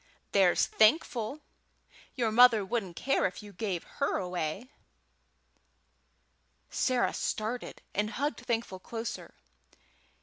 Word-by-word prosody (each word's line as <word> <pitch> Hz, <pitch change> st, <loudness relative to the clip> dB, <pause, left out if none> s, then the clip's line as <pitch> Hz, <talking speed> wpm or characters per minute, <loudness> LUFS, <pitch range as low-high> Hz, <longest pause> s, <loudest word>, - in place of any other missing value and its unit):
"There's 190 Hz, -3 st, +4 dB
Thankful. 240 Hz, +3 st, +2 dB, 0.7 s
Your 235 Hz, -4 st, 0 dB
mother 230 Hz, -3 st, +6 dB
wouldn't 190 Hz, -4 st, -3 dB
care 270 Hz, +1 st, +1 dB
if 185 Hz, -, -9 dB
you 205 Hz, -1 st, -11 dB
gave 185 Hz, -3 st, -3 dB
her 280 Hz, -, -2 dB
away." 180 Hz, -, -3 dB, 2.0 s
Sarah 255 Hz, -2 st, +1 dB
started, 220 Hz, +3 st, -3 dB
and 210 Hz, +1 st, 0 dB
hugged 285 Hz, +6 st, -2 dB
Thankful 225 Hz, -5 st, -2 dB
closer. 230 Hz, +4 st, -6 dB
220 Hz, 100 wpm, -30 LUFS, 195-245 Hz, 2.0 s, mother